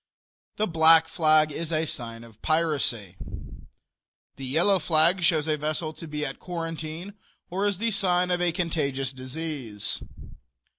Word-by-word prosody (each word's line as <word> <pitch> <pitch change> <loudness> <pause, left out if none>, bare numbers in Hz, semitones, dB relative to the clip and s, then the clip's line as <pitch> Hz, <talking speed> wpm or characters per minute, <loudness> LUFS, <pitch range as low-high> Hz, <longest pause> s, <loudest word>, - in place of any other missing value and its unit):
The 215 - 0
black 160 -2 +6
flag 155 -1 +3
is 165 +2 -4
a 160 0 +1
sign 115 -5 -6
of 115 -2 -17
piracy. 140 - 0 1.2
The 135 - -7
yellow 175 +8 +3
flag 165 +3 +4
shows 160 -3 +2
a 155 -1 +1
vessel 155 +1 -2
to 165 - -10
be 150 0 -3
at 135 - -5
quarantine 165 +1 -5 0.4
or 195 +3 0
is 200 -3 0
the 230 +3 0
sign 180 -3 +2
of 175 0 +1
a 175 -1 +2
contagious 140 -6 -1
disease. 130 -5 -4
160 Hz, 145 wpm, -26 LUFS, 140-175 Hz, 1.2 s, black